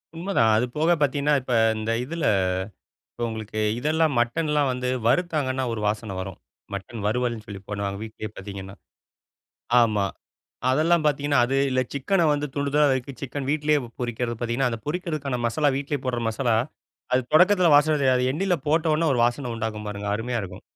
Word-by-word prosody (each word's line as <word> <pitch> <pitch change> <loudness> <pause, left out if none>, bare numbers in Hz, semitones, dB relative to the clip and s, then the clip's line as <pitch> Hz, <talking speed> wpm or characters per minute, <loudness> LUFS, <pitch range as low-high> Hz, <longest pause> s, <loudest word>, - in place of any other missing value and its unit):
உண்மைதான். 165 - +2
அது 120 - +2
போக 160 +3 +3
பார்த்தீங்கன்னா 145 +1 +2
இப்ப 125 0 -3 0.2
இந்த 110 +1 -2
இதில 165 +4 -3 0.9
இப்ப 120 - -6
உங்களுக்கு 110 -1 -5 0.2
இதெல்லாம் 155 +2 +1
மட்டன்லாம் 150 +3 +1
வந்து 125 0 -2 0.2
வறுத்தாங்கன்னா, 140 -3 +1
ஒரு 110 - -4
வாசனை 105 -1 -2
வரும். 95 -1 -6 0.4
மட்டன் 100 +3 -6
வருவல்னு 120 -1 -1
சொல்லி 100 -2 -8
பண்ணுவாங்க, 100 -1 -3
வீட்லேயே 110 -1 -7
பார்த்தீங்கன்னா. 100 0 -8 1.1
ஆமா. 105 -4 +2 0.7
அதெல்லாம் 155 +5 +3
பார்த்தீங்கன்னா, 145 -1 +2
அது 135 +2 0
இல்ல 130 0 +1
சிக்கன 170 +6 +1
வந்து 145 0 -2
துண்டு 140 0 0
துண்டா 150 0 +5
நறுக்கி, 130 +1 -2
சிக்கன் 135 0 -4
வீட்டிலயே 150 0 +2 0.2
பொரிக்கிறது. 120 0 -2
பார்த்தீங்கன்னா, 120 +2 0
அந்த 115 - -4
பொரிக்கறதுக்கான 150 -6 -2
மசாலா, 145 +5 +1
வீட்டிலேயே 140 -1 -3
போடுற 125 -2 -1
மசாலா, 115 0 +1 0.6
அது 130 - +4
தொடக்கத்தில 180 +2 +6
வாசனை 150 +1 +4
தெரியாது. 130 -2 +3
அது 125 0 +1
எண்ணெயில் 175 -2 0
போட்டவோன 160 +1 +2
ஒரு 125 - 0
வாசனை 120 0 -2
உண்டாகும் 110 -1 -4
பாருங்க, 100 0 -5
அருமையா 120 +1 -2
இருக்கும். 95 - -9
130 Hz, 160 wpm, -24 LUFS, 115-150 Hz, 1.1 s, தொடக்கத்தில